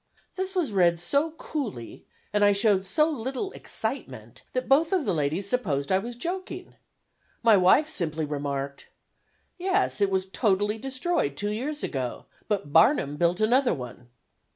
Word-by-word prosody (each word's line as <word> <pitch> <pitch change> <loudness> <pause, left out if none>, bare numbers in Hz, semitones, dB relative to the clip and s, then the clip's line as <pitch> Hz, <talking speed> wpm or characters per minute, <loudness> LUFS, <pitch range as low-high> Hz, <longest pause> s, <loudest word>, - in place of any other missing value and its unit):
'" - - -38
This 380 +1 -3
was 340 -10 0
read 175 -3 +3
so 280 - +1
coolly, 255 - -6 0.3
and 210 0 +3
I 205 0 +6
showed 200 -2 +3
so 305 +10 +3
little 270 - -3
excitement, - - -5
that - - -2
both 310 +4 +4
of 365 -7 +1
the 195 - +1
ladies 160 +5 -1
supposed 155 - -1
I 190 - +4
was 235 +4 -6
joking. 365 +6 -5 0.7
My 225 -2 +7
wife 190 +11 +5
simply 160 - -2
remarked: 140 -1 -4 0.7
"Yes, 375 - +1
it 200 - +4
was 190 -1 0
totally 205 +1 0
destroyed 260 - -1
two 205 +4 -2
years 285 +8 -4
ago, 130 -4 -4 0.2
but 200 -9 -2
Barnum 160 - +4
built 175 +3 +1
another 245 +1 +3
one." 125 -2 -9
205 Hz, 155 wpm, -26 LUFS, -, 0.7 s, My